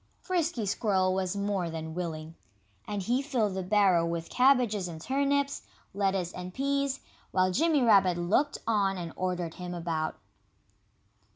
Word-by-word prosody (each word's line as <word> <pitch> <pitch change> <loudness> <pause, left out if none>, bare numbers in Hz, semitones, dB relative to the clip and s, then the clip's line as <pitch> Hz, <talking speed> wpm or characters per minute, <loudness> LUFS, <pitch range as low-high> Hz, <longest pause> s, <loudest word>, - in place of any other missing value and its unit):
Frisky 335 - -1
Squirrel 190 -2 +1
was 190 0 -1
more 200 -3 -1
than 160 -1 -5
willing. 160 -2 -5 0.5
And 205 -2 -3
he 245 +7 +1
filled 245 -8 0
the 190 - -2
barrow 190 -3 +3
with 170 0 -3
cabbages 250 -7 +3
and 165 -2 -7
turnips, 280 - 0 0.3
lettuce 190 -3 0
and 180 0 -7
peas, 280 0 0 0.3
while 185 0 +2
Jimmy 305 - +3
Rabbit 195 -6 +5
looked 205 +12 +1
on 200 -4 +1
and 170 -2 -5
ordered 180 -3 -2
him 180 -1 -6
about. 165 -2 -2
195 Hz, 145 wpm, -29 LUFS, 175-250 Hz, 0.5 s, Rabbit